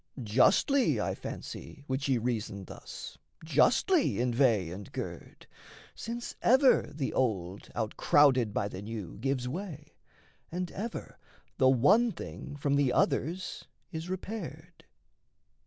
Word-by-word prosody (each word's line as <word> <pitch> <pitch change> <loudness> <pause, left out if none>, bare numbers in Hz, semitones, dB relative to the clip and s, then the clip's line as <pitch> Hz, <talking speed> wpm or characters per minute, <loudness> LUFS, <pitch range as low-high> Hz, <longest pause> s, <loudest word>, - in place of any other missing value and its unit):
Justly, 190 - +3
I - - 0
fancy, 145 - -8
would 130 +1 -1
she 135 -2 +2
reason 110 -4 -3
thus, - - -9 0.3
Justly 250 - +3
inveigh 120 -7 +2
and 95 +2 -8
gird: - - -7 0.5
since 235 +1 -5
ever 260 +2 +5
the 140 -2 -3
old 100 -7 -1
Outcrowded 125 +1 +3
by 100 - -1
the 95 -2 -7
new 105 -3 -6
gives 130 0 -1
way, 155 -1 -6 0.6
and 180 +1 -3
ever 225 +4 -6 0.4
The 130 -2 +6
one 200 - +5
thing 145 - -8
from 140 0 +1
the 140 -3 +3
others 170 +8 0 0.3
is 160 +1 -5
repaired. 175 -4 -6
140 Hz, 120 wpm, -30 LUFS, 115-180 Hz, 0.6 s, The